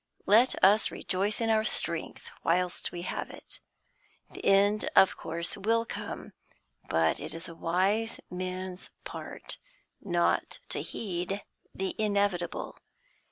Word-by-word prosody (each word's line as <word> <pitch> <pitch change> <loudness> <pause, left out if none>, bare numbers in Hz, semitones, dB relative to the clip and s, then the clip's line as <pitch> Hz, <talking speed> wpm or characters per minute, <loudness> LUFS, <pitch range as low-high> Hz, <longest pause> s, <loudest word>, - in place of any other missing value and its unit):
Let 230 +6 +6
us 205 +3 +6
rejoice 200 +3 -1
in 225 -1 +2
our 215 0 +4
strength, 240 - -1 0.2
whilst 180 +1 +1
we 175 0 -5
have - - -3
it. - - -11 0.7
The - - -9
end 200 +2 +4
of 190 - +7
course 170 +2 -2
will 225 +3 +1
come, - - -6 0.6
but 80 0 +2
it - - -5
is 165 +2 -3
a 165 - -8
wise 195 +7 +1
man's 185 0 -4
part - - -6 0.4
not 175 -3 +1
to - - 0
heed 195 -1 -3 0.3
the 190 0 -1
inevitable. 200 -5 0
190 Hz, 125 wpm, -30 LUFS, 175-210 Hz, 0.7 s, of